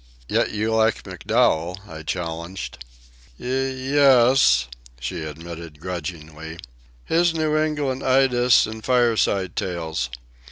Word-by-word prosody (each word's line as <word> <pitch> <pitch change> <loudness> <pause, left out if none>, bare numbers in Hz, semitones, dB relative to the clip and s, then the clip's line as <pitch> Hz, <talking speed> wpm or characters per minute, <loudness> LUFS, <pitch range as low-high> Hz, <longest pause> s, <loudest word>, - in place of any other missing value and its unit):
"Yet - - +1
you 110 +1 -1
like 110 0 +2
MacDowell," 90 -2 0
I 80 -3 -8
challenged. 85 -3 -5 0.6
"Y... - - -10
es," 130 - +3 0.3
she 65 +7 -4
admitted 80 0 -8
grudgingly. 80 -2 -6 0.5
"His 170 0 +2
New 155 -1 0
England 150 -4 0
Idylls 130 -2 +4
and 110 0 -8
Fireside 115 -7 +2
Tales. 80 -8 -3
100 Hz, 105 wpm, -23 LUFS, 80-130 Hz, 0.6 s, Idylls